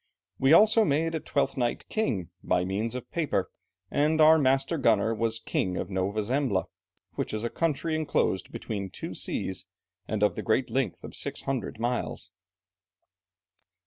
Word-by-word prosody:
We 135 +2 +4
also 220 +6 +7
made 160 0 +1
a 160 - -1
Twelfth 140 -1 -1
Night 120 -2 -1
king, 100 - -1
by 90 - +1
means 105 +5 -2
of 125 -1 -7
paper, 150 - -1 0.4
and 155 +2 +2
our 160 +1 +7
master 135 +3 +2
gunner 110 -3 +3
was 115 0 0
king 95 -4 -1
of - - -4
Nova 95 +3 -1
Zembla, 125 -4 0 0.5
which - - -3
is 110 - -3
a 120 - -2
country 160 -1 0
enclosed 150 - 0
between 100 -3 -4
two - - -6
seas, 95 0 -3 0.4
and 105 -1 -1
of 105 - +4
the - - -4
great 120 +3 +1
length 135 -1 -1
of - - -8
six - - -3
hundred 130 -5 -3
miles." 120 +1 -2
125 Hz, 160 wpm, -28 LUFS, 105-150 Hz, 0.5 s, also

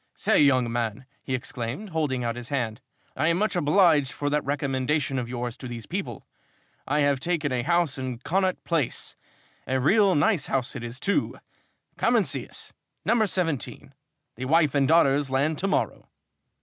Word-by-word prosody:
"Say, - - +2
young 130 -5 +4
man," 120 +1 -2 0.2
he 130 - -2
exclaimed, 125 - -4
holding 145 -6 -1
out 115 -1 -2
his 120 0 -7
hand, 120 -6 -2 0.3
"I 150 +4 +1
am 170 0 +3
much 205 -1 0
obliged 155 -4 +4
for 145 0 -3
that 150 0 +1
recommendation 135 0 -1
of 120 -1 -5
yours 120 -1 -4
to 130 - -8
these 120 -2 -7
people! 150 - -5 0.6
I 150 +2 +1
have 140 -2 +2
taken 155 -2 -1
a 125 -1 0
house 170 -1 +1
in 130 -2 -4
Connaught 185 +8 -1
Place 165 -7 -1 0.5
a 130 0 +1
real 195 - +4
nice 170 0 +2
house 135 0 -1
it 125 - -5
is, 120 +2 -6
too. 200 - 0 0.6
Come - - +2
and - - +3
see - - -1
us - - -8 0.3
number 225 -2 +3
17. 165 -8 -2 0.4
The 130 - -4
wife 155 0 +3
and 140 -2 +3
daughters 145 -3 +4
land 140 +4 0
to 195 - 0
morrow." - - -1
140 Hz, 175 wpm, -26 LUFS, 125-165 Hz, 0.6 s, young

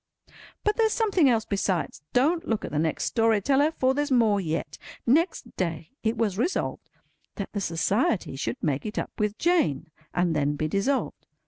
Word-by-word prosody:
But 420 0 +1
there's 445 -2 +3
something 390 - +3
else 225 -3 +2
besides. 195 -7 -1
Don't 325 +7 +2
look 225 -2 -1
at - - -7
the 150 - 0
next 160 0 0
story 225 -2 +2
teller, 280 +7 +3
for 265 -5 +1
there's 290 +1 -1
more 225 -6 +3
yet. 155 -3 -3 0.3
Next 300 -1 +1
day, 165 -3 -3
it 225 +1 0
was 210 -3 0
resolved 335 +10 -1 0.5
that 200 - -6
the 205 - -2
Society 185 - 0
should 120 -3 -3
make 145 -3 0
it 215 0 -6
up - - -2
with 210 0 0
Jane, 265 - +1 0.2
and 175 -2 +1
then 145 0 +1
be 155 +1 -1
dissolved. 220 - -1
215 Hz, 180 wpm, -26 LUFS, 165-275 Hz, 0.5 s, there's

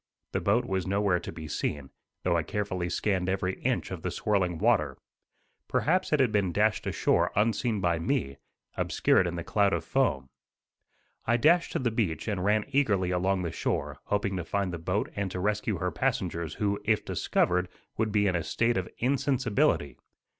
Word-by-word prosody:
The - - -1
boat 115 +5 +2
was 95 -3 -2
nowhere 100 -2 +2
to - - -7
be 80 -1 -8
seen, 75 -2 -3 0.3
though - - +2
I 85 - +2
carefully 95 -1 -3
scanned 95 -1 0
every 95 0 -1
inch - - -1
of - - -5
the - - -2
swirling 95 -5 0
water. 95 - +2 0.7
Perhaps 185 +4 +1
it 150 - +3
had 130 -5 +3
been 100 -4 +1
dashed 105 +4 +1
ashore - - +2
unseen 110 +1 +1
by 85 -2 +1
me, 85 - -1 0.4
obscured 90 - +2
in 85 - -3
the 85 - -4
cloud 100 +1 +2
of - - -1
foam. 65 -1 +1 1.0
I 120 +1 +3
dashed 165 +7 +3
to - - +1
the 125 -6 0
beach 105 -7 -1
and 100 -4 -1
ran 105 +1 +2
eagerly 105 -10 +2
along 95 +1 +1
the 85 - -2
shore, - - -2
hoping 100 -1 0
to 90 - -3
find 95 +2 -2
the 85 - -4
boat 90 +5 -1
and 100 -2 -2
to 90 - -5
rescue 105 +1 0
her 90 +2 -1
passengers 85 -6 -2
who, 100 -1 -1
if 110 -2 +1
discovered, 90 +1 +1 0.3
would 110 -1 0
be 105 -1 +2
in 95 -2 +2
a 85 - +1
state 115 +7 0
of 90 -1 -2
insensibility. 125 - +1
100 Hz, 185 wpm, -28 LUFS, 90-110 Hz, 1.0 s, it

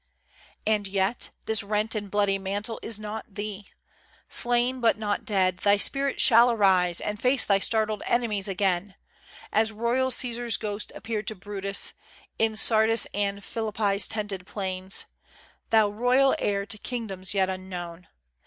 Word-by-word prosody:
And 210 -2 +1
yet, 195 +4 -1 0.2
this 220 -2 +3
rent 210 +2 -1
and 205 -2 -3
bloody 200 -1 +1
mantle 205 +4 -3
is 220 -2 -4
not 215 -1 -7
thee. 205 -1 -6 0.6
Slain, 245 +1 +3
but 225 -4 +3
not 210 -1 -2
dead 185 -3 +1
thy 200 +2 +3
spirit 275 +6 +1
shall 235 -2 +6
arise 190 -6 +3
And 210 0 -4
face 255 -1 +3
thy 200 -1 +3
startled 215 0 +1
enemies 215 -5 0
again, 195 0 -1 0.6
As 220 0 +3
royal 235 +4 0
Cæsar's 240 -2 +1
ghost 210 0 -5
appeared 215 -2 -4
to 220 - -3
Brutus, 200 +1 -2 0.5
In 220 -1 +2
Sardis' 220 +1 +3
and 200 0 -1
Philippi's 215 -3 0
tented 205 -4 -4
plains. 190 -1 -2 0.6
Thou 220 -2 +4
royal 250 +5 +3
heir 200 -1 -1
to 210 +1 -7
kingdoms 205 -7 -4
yet 190 -1 +3
unknown! 180 -2 -7
210 Hz, 145 wpm, -26 LUFS, 195-225 Hz, 0.6 s, shall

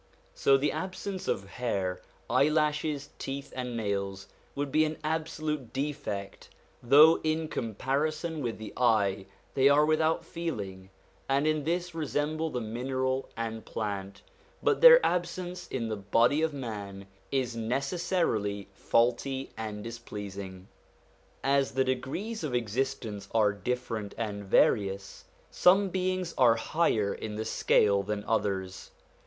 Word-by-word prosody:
So 135 0 +4
the 145 +2 +1
absence 190 0 -5
of 95 - 0
hair, 95 -4 -2 0.3
eyelashes, 150 -1 +1
teeth, 135 +1 -5
and 125 -2 -3
nails, 100 -3 -2 0.3
would 140 -1 -2
be 155 +2 +4
an 155 0 -2
absolute 155 -4 -2
defect, 135 -9 -4 0.3
though 150 +6 +7
in 155 0 0
comparison 150 - -2
with 120 -4 -3
the 110 -1 -8
eye 100 -6 +2 0.3
they 135 +1 +5
are 145 +1 +5
without 155 +1 +1
feeling, 100 - -5 0.4
and 140 +2 +2
in 155 -2 +1
this 175 +2 -1
resemble 155 0 -1
the 125 - -3
mineral 130 +4 -2
and 115 -1 -4
plant; 100 -2 -5 0.4
but 450 -3 +2
their - - +9
absence 180 0 -2
in 120 -3 -3
the 110 -1 -3
body 115 +9 +3
of 160 0 +1
man 105 -8 -6 0.3
is 130 -3 0
necessarily 120 - -1
faulty 125 +6 0
and 105 -2 -5
displeasing. 100 -5 -7 0.8
As 135 -2 +2
the 130 +1 +2
degrees 135 - -3
of 140 -5 -2
existence 115 -3 -2
are 105 -2 +4
different 110 0 -3
and 100 -3 -4
various, 100 0 +1 0.3
some 195 +2 +4
beings 185 -1 -1
are 120 -3 +6
higher 115 -5 +1
in 105 -1 -6
the 110 +1 -3
scale 100 -2 +3
than 105 +1 -3
others. 95 -4 -1
130 Hz, 130 wpm, -29 LUFS, 105-155 Hz, 0.8 s, their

